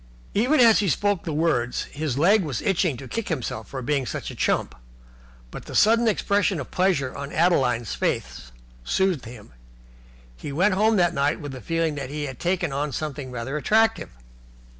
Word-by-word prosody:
Even 255 +9 +2
as 230 -3 +7
he 200 -2 +1
spoke 205 +2 0
the 160 - -3
words 145 -6 0
his 150 -3 -3
leg 195 +8 +4
was 145 -9 -3
itching 175 -7 +1
to 130 - -9
kick 230 - -4
himself 120 -8 -4
for 130 -2 -6
being 135 -1 0
such - - -5
a - - -10
chump, - - 0 0.8
but - - -9
the - - -8
sudden 230 +2 +4
expression 200 -3 +1
of 130 - -7
pleasure 180 -9 +1
on 140 0 -6
Adeline's 130 - +1
face - - -3 0.3
soothed 180 - 0
him; 115 -2 -11
and - - -23 0.8
he 145 - -7
went 185 +8 +2
home 215 +3 +3
that 175 -3 +3
night 145 +1 0
with 145 -3 -6
the 130 -1 -8
feeling 165 -2 -1
that 140 -3 -5
he 150 +1 -4
had 135 -4 -6
taken 175 -4 -1
on 145 +1 -2
something 145 -2 -5
rather 125 +4 -4
attractive. 220 +8 +2
155 Hz, 185 wpm, -24 LUFS, 135-190 Hz, 0.8 s, as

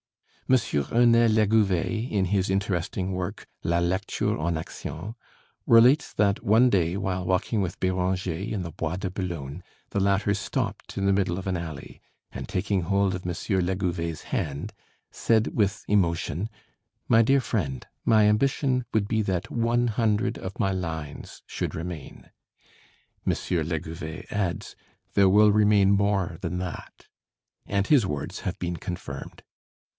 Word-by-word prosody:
M. - - +5 0.4
Ernest 115 -1 +5
Legouvé 110 +1 +2
in 100 -3 +2
his 95 0 0
interesting 95 -1 -1
work, 90 -1 -4 0.2
'La 85 +1 +1
Lecture 95 +4 0
en 85 -1 0
Action,' 90 +5 -6 0.5
relates 125 +6 +6
that 100 -1 +1
one 115 +5 +5
day, 90 -4 +1
while 95 -2 -2
walking 95 +4 0
with 90 -2 -3
Béranger 95 +1 -1
in 100 -4 -2
the 85 - -6
Bois 80 +3 -3
de 95 0 -3
Boulogne, 85 -4 -5 0.3
the - - 0
latter 100 +1 +2
stopped 95 - -3
in 100 - 0
the 100 - +4
middle 95 -3 +1
of 95 - -5
an 95 - 0
alley, 80 -3 -7 0.3
and - - -6
taking 95 +1 0
hold 100 +1 +1
of 90 - -7
M. 90 - -1
Legouvé's 90 -3 -1
hand, 75 +9 -3 0.4
said 110 -1 +1
with 100 -3 0
emotion, 90 -1 +1 0.6
"My 115 - +6
dear 135 +4 +4
friend, 75 - -2 0.2
my 110 -2 +5
ambition 130 +3 +2
would 105 -2 +2
be 110 0 +1
that 95 -4 -2
one 120 +1 +1
hundred 110 -2 +1
of 95 0 -7
my 95 - +2
lines 80 -5 -5
should - - -4
remain." 80 -3 -7 0.9
M. - - +3
Legouvé 80 0 -3
adds, 95 -5 -2 0.4
"There 100 -1 +5
will 105 +2 +6
remain 105 -2 +4
more 100 -4 +1
than 90 - -3
that," 90 -3 -7 0.6
and 100 0 +1
his 140 -8 +5
words 75 -6 -4
have - - -4
been 85 -1 -2
confirmed. 90 +3 -7
95 Hz, 145 wpm, -26 LUFS, 85-105 Hz, 0.9 s, relates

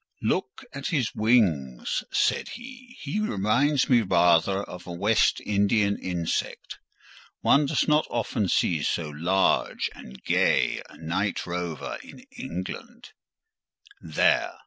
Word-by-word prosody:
"Look 395 -10 -1
at 140 - -4
his 135 -8 0
wings," 85 - +1
said - - +1
he, 255 +1 -11
"he 150 +8 -3
reminds 135 - +1
me 120 -3 +5
rather 95 0 +3
of 90 -2 -10
a - - -6
West 100 +6 +2
Indian 100 0 +2
insect; 85 -3 -3 0.6
one 145 0 +4
does 150 - +1
not 150 0 +3
often 110 -4 -1
see 80 -3 +1
so 80 +2 -1
large 85 +6 +1
and 65 +1 -12
gay - - +2
a - - -15
night 85 +5 -2
rover 85 -3 -4
in - - -13
England; 90 +2 -7 0.9
there! 80 -2 +1
100 Hz, 125 wpm, -26 LUFS, 85-135 Hz, 0.9 s, me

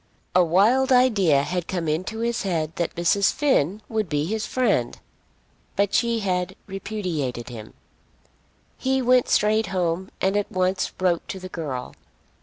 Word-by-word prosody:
A 180 - +5
wild 220 - +3
idea 200 - +4
had 175 +2 -3
come 175 -3 -2
into 185 +9 -2
his 235 0 -1
head 165 -4 -2
that 170 - -2
Mrs. 175 +4 +3
Finn 215 - +1
would 220 -5 -2
be 150 0 0
his 215 +4 -2
friend; 210 - 0 0.8
but 200 0 +1
she 235 -1 +2
had 185 -1 -1
repudiated 180 - -4
him. 110 -3 -10 1.0
He 265 0 +1
went 250 0 +4
straight 215 +1 +2
home 180 0 -1
and 190 +1 +1
at 205 -1 -1
once 185 +1 0
wrote 180 -2 +1
to 190 - -5
the 185 0 -8
girl. 145 -8 -5
190 Hz, 150 wpm, -24 LUFS, 165-220 Hz, 1.0 s, A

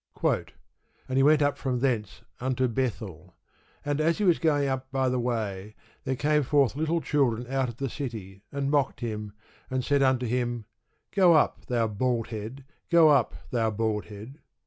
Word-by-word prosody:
And 130 - -4
he - - +5
went 150 +1 +5
up 145 0 0
from 125 -2 -1
thence 120 -6 -1 0.2
unto 130 0 0
Bethel: 110 - -4 0.5
and 145 +1 0
as 165 +2 +2
he 210 - -1
was 175 -4 +4
going 145 -3 +2
up 130 -1 -3
by 130 -1 +1
the 125 0 0
way, 110 -4 -3 0.3
there 130 -1 0
came 150 +3 +2
forth 140 -1 +2
little 160 +3 0
children 125 -5 +1
out 135 -1 0
of 120 - -9
the 135 - -2
city, 110 -8 -6
and 140 0 -2
mocked 145 -3 +1
him, 105 -3 -4 0.4
and 130 -1 -2
said 145 -1 +2
unto 130 -2 +2
him, 120 -1 -2 0.5
Go 185 -3 +5
up, 155 - +1
thou 120 -2 +1
bald 115 +2 -1
head; 115 +5 -7 0.2
go 170 -2 +6
up, 140 -6 +3 0.2
thou 115 -2 +1
bald 110 -1 -1
head. 110 +8 -11
130 Hz, 175 wpm, -27 LUFS, 115-140 Hz, 0.5 s, go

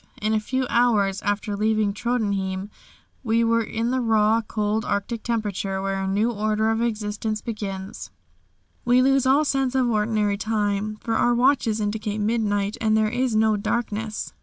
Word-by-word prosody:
In 215 +1 0
a 215 - +2
few 260 +4 -2
hours 210 -6 +2
after 205 0 -1
leaving 215 -1 +1
Tröndhjem 200 -4 -2 0.5
we 230 -1 +2
were 230 0 +2
in 225 +2 -2
the 260 0 0
raw, 220 -1 +3
cold 215 0 -1
Arctic 210 +2 -2
temperature 205 -4 -2
where 195 0 -2
a 190 - -2
new 210 +5 +1
order 215 0 0
of 225 +1 0
existence 215 -1 -2
begins. 200 -3 -6 0.7
We 245 +1 +4
lose 270 0 +3
all 285 +4 +4
sense 270 -2 0
of 260 -2 +2
ordinary 210 -2 +1
time, 210 -1 -1
for 230 - -2
our 240 +1 +2
watches 245 -3 +2
indicate 210 0 -2
midnight, 210 -2 0
and 220 -1 +3
there 215 -1 +1
is 245 -1 0
no 215 -1 +3
darkness. 215 0 -3
215 Hz, 160 wpm, -24 LUFS, 205-235 Hz, 0.7 s, We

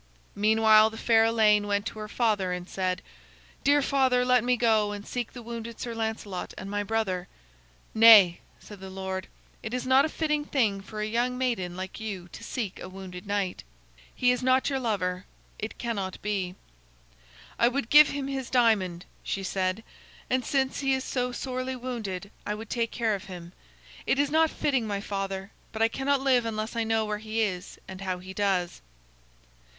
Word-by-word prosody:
Meanwhile 215 +1 +5
the 220 - -10
fair 225 -1 +4
Elaine 215 -2 +4
went 205 0 0
to 220 - -5
her 215 - -5
father 210 -5 0
and 180 0 -4
said: 185 -2 -2 0.6
"Dear 285 0 +4
father, 260 -2 +2
let 250 -2 +4
me 250 0 +2
go 220 -3 +2
and 205 0 -7
seek 245 -2 -4
the 245 - -9
wounded 230 0 -7
Sir 235 - -4
Lancelot 220 -4 -4
and 195 +1 -7
my 205 0 0
brother." 200 -4 -1 0.7
"Nay," 220 -6 +8 0.2
said 205 -2 -12
the 190 0 -8
lord, 190 0 -5 0.3
"it 220 +2 -4
is 250 - -3
not 260 +1 +5
a 315 - 0
fitting 300 -2 -1
thing 220 -9 0
for 215 +2 -7
a - - 0
young 240 +3 0
maiden 190 -9 -1
like 190 +2 -6
you 200 -5 -5
to - - -11
seek 215 -8 -4
a - - -7
wounded 185 0 -9
knight. 200 -2 -2 0.5
He 250 0 +3
is 250 - -1
not 260 +2 +2
your 270 - 0
lover. 185 -6 -2 0.3
It 215 - -5
cannot 200 -6 -3
be." 195 -3 -2 1.0
"I 235 - +5
would 255 -1 -2
give 300 0 +9
him 280 -1 -3
his 270 -2 -4
diamond," 200 -8 +2 0.2
she 195 - -3
said, 190 +2 -1 0.5
"and 255 0 +2
since 265 0 0
he 270 -1 +2
is 260 - -3
so 250 -1 -1
sorely 255 +1 -3
wounded, 220 -6 -5
I 210 - -2
would 220 +1 -9
take 230 -1 0
care 225 -2 0
of 200 -1 -4
him. 175 -2 -9 0.5
It - - +2
is 285 0 +1
not 320 +1 +4
fitting, 265 -8 0
my 200 -1 -2
father, 195 -1 -4 0.2
but 225 0 0
I - - +6
cannot 275 +3 0
live 260 -3 +3
unless 220 0 -3
I 230 - +1
know 225 0 +1
where 210 0 -3
he 220 +1 -2
is 185 -4 -3
and 190 0 -9
how 185 -2 -2
he 185 +1 -9
does." 190 - 0
220 Hz, 190 wpm, -27 LUFS, 195-250 Hz, 1.0 s, give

